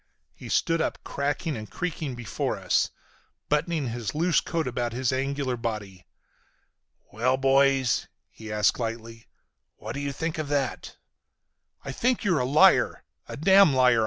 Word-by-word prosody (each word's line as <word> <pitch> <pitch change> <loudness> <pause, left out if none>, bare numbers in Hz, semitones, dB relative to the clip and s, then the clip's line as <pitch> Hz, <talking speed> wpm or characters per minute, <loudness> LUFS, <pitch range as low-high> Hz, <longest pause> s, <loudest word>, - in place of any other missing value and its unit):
He - - -11
stood 165 0 +1
up - - -1
cracking 145 +3 -2
and 110 -2 -7
creaking 155 - -4
before 120 -3 -3
us, - - +1 0.6
buttoning 150 -2 0
his 115 -1 -4
loose 170 +2 +2
coat 165 -2 -2
about 120 -1 -2
his 130 +1 0
angular 135 -1 -1
body. 105 -6 -5 1.1
"Well, 125 +4 +1
boys," 135 -1 +3 0.2
he 110 -1 -10
asked 105 +2 +2
lightly, 115 -1 -5 0.5
"what 110 +2 -7
do 140 - -5
you 140 0 -2
think 160 +3 -4
of 155 - -3
that?" 140 -3 -2 0.9
"I 135 - -4
think 240 - 0
you're 180 -7 +2
a 125 - 0
liar! 145 +4 +4 0.2
A - - -7
damn 190 -2 +6
liar!" 125 -2 +5
135 Hz, 150 wpm, -26 LUFS, 115-155 Hz, 1.1 s, damn